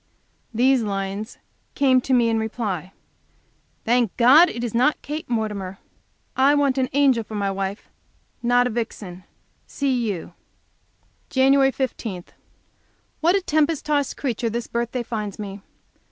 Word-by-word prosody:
These 250 +2 +3
lines 200 +1 -4 0.4
came 260 -2 +4
to 265 - -5
me 240 -2 +3
in 225 -1 +1
reply: 205 -6 -3 0.9
"Thank 235 -3 +1
God 280 +9 +7
it 240 - -5
is 235 - -3
not 255 +6 +2
Kate 300 -1 -5
Mortimer. 210 -5 -3 0.6
I 275 +2 +4
want 280 -2 +2
an 255 - 0
angel 270 -5 +3
for 215 - -9
my 200 -1 -1
wife, 195 +1 -4 0.5
not 245 +1 +3
a 250 - -1
vixen. 205 -5 -5 0.4
C. 280 -1 -1 0.2
U." 175 -2 -7 1.0
Jan. 270 +1 +4
15 225 -9 -4 1.0
What 340 +4 +3
a 395 - +2
tempest 310 -2 0
tossed 290 -2 0
creature 240 -4 -2
this 235 +1 -3
birthday 235 +1 -3
finds 215 -4 -5
me. 200 -1 -7
240 Hz, 140 wpm, -23 LUFS, 210-270 Hz, 1.0 s, God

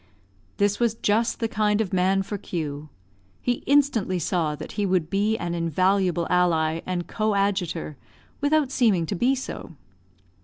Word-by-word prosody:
This 205 0 +1
was 235 -2 +1
just 225 +1 +1
the 225 - 0
kind 210 -1 +1
of 205 -4 -1
man 190 +1 +2
for 205 +1 -5
Q. 155 -5 -5 0.5
He 245 -1 -1
instantly 265 -10 +2
saw 160 -2 0
that - - -8
he 205 - -2
would 185 -5 0
be 210 +3 +1
an 170 -3 -3
invaluable 175 +1 +1
ally 165 -3 +2
and 180 -1 -2
coadjutor, 200 - -1 0.4
without 290 -1 +2
seeming 210 -11 +2
to 180 - -3
be 250 +9 +2
so. 250 -9 -7
195 Hz, 150 wpm, -25 LUFS, 170-220 Hz, 0.5 s, man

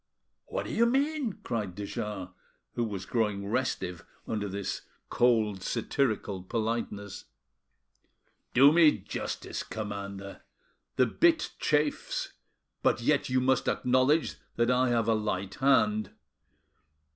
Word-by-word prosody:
"What - - -3
do - - -5
you 235 +1 +4
mean?" 275 -2 +1
cried 105 -7 -3
de 100 0 -5
Jars, 100 -3 -4 0.4
who 120 - -1
was 100 -4 -4
growing 105 -2 0
restive 100 -6 -2 0.2
under 105 -2 -2
this 100 +1 -3 0.3
cold, 110 -5 +2
satirical 110 -4 -1
politeness. 110 -1 -3 1.3
"Do 135 +3 +8
me 160 -5 +6
justice, 95 - -5
commander. 100 -2 -6 0.5
The 130 - +4
bit 325 - +2
chafes, 150 -1 0 0.5
but - - +2
yet 145 +2 +2
you 130 0 +2
must 130 +1 +2
acknowledge 130 +5 +2 0.2
that 120 +1 +2
I 125 0 +3
have 115 -2 +1
a 115 - +4
light 100 -3 -2
hand. 110 -6 +3
115 Hz, 120 wpm, -29 LUFS, 100-130 Hz, 1.3 s, Do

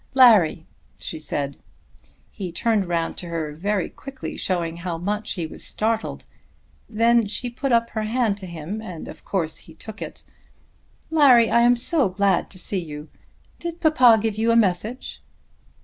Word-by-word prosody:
"Larry," 215 - +6 0.3
she 160 - -6
said. 140 -2 -3 0.7
He 185 -3 -6
turned 210 +2 +1
round 170 -1 -1
to 175 - -6
her 160 -3 -3
very 195 +4 -1
quickly, 270 -2 -8
showing 170 -3 -1
how 170 -1 -4
much 205 +5 -2
he 170 -4 -3
was 155 - -7
startled. 220 +1 -2 0.6
Then 230 0 +3
she 240 +4 -2
put 265 +2 -2
up 230 0 +2
her 220 - -2
hand 220 -3 0
to 190 - -8
him, 170 +5 -6
and 180 -7 -8
of - - -11
course 165 -5 -2
he 165 - -15
took 215 +5 -9
it. - - -7 0.9
"Larry, 260 -7 +6
I 235 - +5
am 240 +1 +5
so 260 - +1
glad 195 -1 +1
to 185 - -11
see 185 0 -2
you. 150 -1 -8 0.5
Did 340 0 -5
papa 255 -9 +6
give 215 -1 -2
you 225 +1 +2
a 230 - +4
message?" 220 +3 0
210 Hz, 165 wpm, -23 LUFS, 170-235 Hz, 0.9 s, Larry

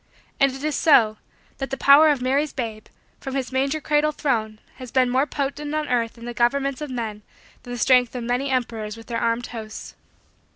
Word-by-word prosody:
And 275 0 +4
it 270 +2 -9
is 305 -1 -1
so, 225 -9 +4 0.4
that 270 - -3
the 270 - -3
power 290 +3 +7
of 280 -4 +1
Mary's 275 +4 +1
babe, 225 -4 -5 0.3
from 270 -1 -6
his 265 -2 -2
manger 275 +4 0
cradle 300 0 +1
throne, 225 -8 -1 0.2
has 255 -1 -9
been 255 0 +2
more 265 +3 +2
potent 290 +1 -3
on 305 -1 -1
earth 235 -2 0
in 235 - -10
the 240 - -5
governments 275 +3 0
of 300 - -4
men 225 -4 -4 0.4
than 245 - -10
the 245 - -4
strength 250 +1 +3
of 245 - -4
many 250 +4 -1
emperors 230 -4 -2
with 225 - -12
their 230 0 -3
armed 230 +1 0
hosts. 220 -2 -8
255 Hz, 205 wpm, -23 LUFS, 235-280 Hz, 0.4 s, power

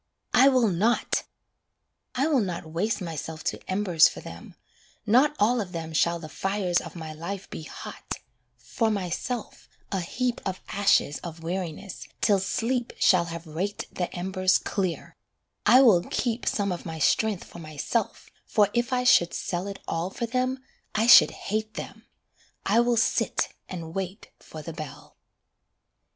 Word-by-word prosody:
I 260 +2 +7
will 255 -5 +3
not! 210 +7 +1 0.9
I 265 - +2
will 300 -4 +3
not 180 -4 -3
waste 195 +7 -1
myself 160 -2 -5
to - - -2
embers 185 -4 +5
for - - -9
them, - - -10 0.5
Not 260 +7 +4
all 235 +4 +3
for 185 - -12
them 165 -2 -6
shall 170 +2 +2
the 165 -2 -8
fires 190 +1 0
of - - -10
my 160 -2 -6
life 180 +5 -6
be - - -6
hot, 155 - -7 0.4
For 225 -2 -1
myself 210 +4 -4 0.2
a 195 - 0
heap 240 +8 -2
of 185 -1 -3
ashes 200 -7 +2
of 165 -1 -8
weariness, 180 +1 -5
till 200 -3 +3
sleep 235 +5 -1
Shall 180 -3 +4
have 170 0 -7
raked 175 +6 -4
the 180 - -2
embers 185 +1 +1
clear: 185 -5 -3 0.5
I 255 +2 +8
will 205 -9 +6
keep 240 -1 -2
Some 200 -2 +1
of 175 - -4
my 160 -2 -6
strength 205 +6 +2
for - - -12
myself, 155 +8 -3 0.2
for 205 -2 +3
if 240 +2 0
I 250 -1 +1
should 175 -9 +5
sell 180 +2 -3
It 200 -1 -5
all 165 +2 -1
for 235 - -3
them, 255 +2 -1 0.3
I 220 +1 +3
should 240 - +9
hate 215 +1 -4
them - - -8 0.6
I 215 +4 +4
will 240 0 +3
sit 225 - +1 0.2
and 165 -3 -6
wait 195 +2 -5
for 155 -1 -10
the 165 - -6
bell. 150 -2 -9
190 Hz, 160 wpm, -26 LUFS, 170-225 Hz, 0.9 s, should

